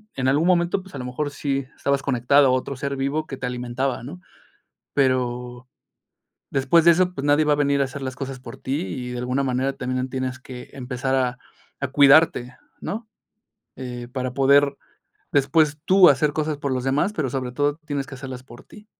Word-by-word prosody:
en 130 Hz, -1 st, -1 dB
algún 145 Hz, +5 st, +3 dB
momento, 175 Hz, +1 st, +2 dB
pues 190 Hz, -, -16 dB
a 135 Hz, -, -6 dB
lo 125 Hz, -, -5 dB
mejor 145 Hz, +3 st, -3 dB
sí 140 Hz, -2 st, -2 dB
estabas 140 Hz, 0 st, 0 dB
conectado 135 Hz, +2 st, +4 dB
a -, -, +3 dB
otro 130 Hz, +2 st, -1 dB
ser 140 Hz, +1 st, -3 dB
vivo 140 Hz, +3 st, -1 dB
que 135 Hz, -, -6 dB
te 125 Hz, -, -3 dB
alimentaba, 125 Hz, +1 st, -3 dB
¿no? 175 Hz, +9 st, -9 dB, 0.7 s
Pero, 125 Hz, -2 st, -1 dB, 0.8 s
después 140 Hz, +5 st, +3 dB
de 170 Hz, -, +8 dB
eso, 180 Hz, +1 st, +2 dB
pues 140 Hz, -, -5 dB
nadie 145 Hz, +1 st, +4 dB
va 150 Hz, -, +3 dB
a 145 Hz, -, +3 dB
venir 140 Hz, -1 st, +2 dB
a -, -, +3 dB
hacer 135 Hz, +1 st, -7 dB
las 130 Hz, -1 st, -4 dB
cosas 135 Hz, -1 st, -6 dB
por 120 Hz, -2 st, -10 dB
ti 140 Hz, +4 st, -2 dB
y 125 Hz, -7 st, -5 dB
de 125 Hz, -, -4 dB
alguna 125 Hz, +3 st, -1 dB
manera 130 Hz, +1 st, 0 dB
también 130 Hz, 0 st, -3 dB
tienes 130 Hz, -1 st, -3 dB
que 125 Hz, -1 st, -10 dB
empezar 130 Hz, 0 st, -3 dB
a 125 Hz, -2 st, 0 dB, 0.4 s
a 140 Hz, -, -1 dB
cuidarte, 140 Hz, -2 st, +4 dB, 0.2 s
¿no? 215 Hz, +6 st, -5 dB, 0.7 s
Eh, 125 Hz, -2 st, -7 dB
para 130 Hz, -1 st, -3 dB
poder 140 Hz, +1 st, +4 dB, 0.6 s
después 145 Hz, +2 st, +3 dB
tú 190 Hz, -1 st, +7 dB
hacer 145 Hz, +2 st, +3 dB
cosas 155 Hz, -1 st, -1 dB
por 140 Hz, -2 st, -2 dB
los 130 Hz, -1 st, -1 dB
demás, 140 Hz, +10 st, +1 dB
pero 145 Hz, -, -2 dB
sobre 130 Hz, -2 st, -3 dB
todo 145 Hz, +2 st, 0 dB
tienes 140 Hz, -2 st, -3 dB
que 135 Hz, -, -8 dB
hacerlas 130 Hz, -1 st, -7 dB
por 120 Hz, -2 st, -14 dB
ti. 210 Hz, 0 st, -16 dB
135 Hz, 200 wpm, -23 LUFS, 130-145 Hz, 0.8 s, de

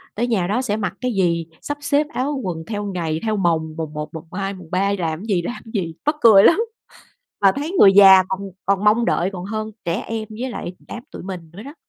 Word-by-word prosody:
tới 240 Hz, +3 st, 0 dB
nhà 190 Hz, -7 st, 0 dB
đó 230 Hz, +6 st, 0 dB
sẽ 215 Hz, -4 st, -1 dB
mặc 200 Hz, -3 st, -2 dB
cái 250 Hz, -1 st, -1 dB
gì? 170 Hz, -4 st, 0 dB
Sắp 290 Hz, 0 st, -4 dB
xếp 290 Hz, +1 st, +1 dB
áo 275 Hz, +2 st, -1 dB
quần 165 Hz, -3 st, -4 dB
theo 205 Hz, -2 st, -3 dB
ngày, 165 Hz, -5 st, -2 dB
theo 215 Hz, -2 st, 0 dB
mồng. 160 Hz, -4 st, 0 dB
Mồng 155 Hz, -2 st, -5 dB
1, 150 Hz, +1 st, -6 dB
mồng 160 Hz, +1 st, -8 dB
2, 195 Hz, 0 st, -3 dB
mồng 180 Hz, -4 st, -12 dB
3 195 Hz, +2 st, +1 dB
làm 165 Hz, +2 st, -3 dB
gì, 195 Hz, -6 st, 0 dB
làm 240 Hz, +8 st, -6 dB
gì, 170 Hz, -6 st, -2 dB
mắc 300 Hz, +1 st, +2 dB
cười 210 Hz, -4 st, +8 dB
lắm. 345 Hz, -, +6 dB, 0.8 s
Mà 195 Hz, -1 st, +5 dB
thấy 295 Hz, +4 st, -4 dB
người 195 Hz, -1 st, +8 dB
già 190 Hz, -1 st, +8 dB
còn 190 Hz, +1 st, -3 dB, 0.3 s
còn 200 Hz, +1 st, +1 dB
mong 225 Hz, +3 st, +4 dB
đợi 190 Hz, -5 st, +1 dB
còn 180 Hz, -1 st, -6 dB
hơn 215 Hz, +2 st, -4 dB
trẻ 170 Hz, +6 st, -1 dB
em 220 Hz, -1 st, -4 dB
với 260 Hz, -, -2 dB
lại 180 Hz, -6 st, -6 dB
đám 235 Hz, -, -7 dB
tụi -, -, -9 dB
mình 180 Hz, -3 st, -8 dB
nữa 200 Hz, +5 st, -10 dB
đó. 285 Hz, +4 st, -10 dB
195 Hz, 235 wpm, -21 LUFS, 175-225 Hz, 0.8 s, cười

